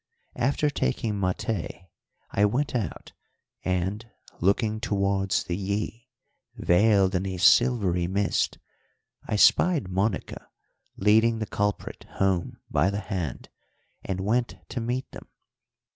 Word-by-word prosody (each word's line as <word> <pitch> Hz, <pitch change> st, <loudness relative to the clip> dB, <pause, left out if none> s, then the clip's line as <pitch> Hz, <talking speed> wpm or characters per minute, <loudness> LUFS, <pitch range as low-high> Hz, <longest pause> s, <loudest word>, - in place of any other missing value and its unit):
After 140 Hz, +4 st, +1 dB
taking 105 Hz, -, -1 dB
maté 95 Hz, -1 st, -3 dB, 0.5 s
I 100 Hz, -, +2 dB
went 135 Hz, +8 st, 0 dB
out, 110 Hz, -10 st, -4 dB, 0.5 s
and, 95 Hz, +4 st, -1 dB, 0.4 s
looking 105 Hz, +4 st, +1 dB
towards 100 Hz, -3 st, 0 dB
the 85 Hz, -, -3 dB
Yí, 105 Hz, +5 st, -3 dB, 0.5 s
veiled 95 Hz, +1 st, +3 dB
in 95 Hz, +1 st, 0 dB
a 95 Hz, -1 st, -4 dB
silvery 95 Hz, -3 st, +4 dB
mist, 100 Hz, +2 st, 0 dB, 0.7 s
I -, -, -1 dB
spied 150 Hz, -, +4 dB
Monica 95 Hz, +1 st, -2 dB, 0.5 s
leading 110 Hz, +3 st, +4 dB
the 110 Hz, -, -2 dB
culprit 105 Hz, 0 st, -3 dB
home 95 Hz, -3 st, 0 dB
by 80 Hz, +5 st, +2 dB
the 100 Hz, +1 st, -2 dB
hand, 90 Hz, -8 st, -4 dB, 0.5 s
and 95 Hz, -1 st, -3 dB
went 115 Hz, +5 st, 0 dB
to 125 Hz, -, -3 dB
meet 125 Hz, +3 st, -2 dB
them. -, -, -11 dB
100 Hz, 115 wpm, -26 LUFS, 95-115 Hz, 0.7 s, silvery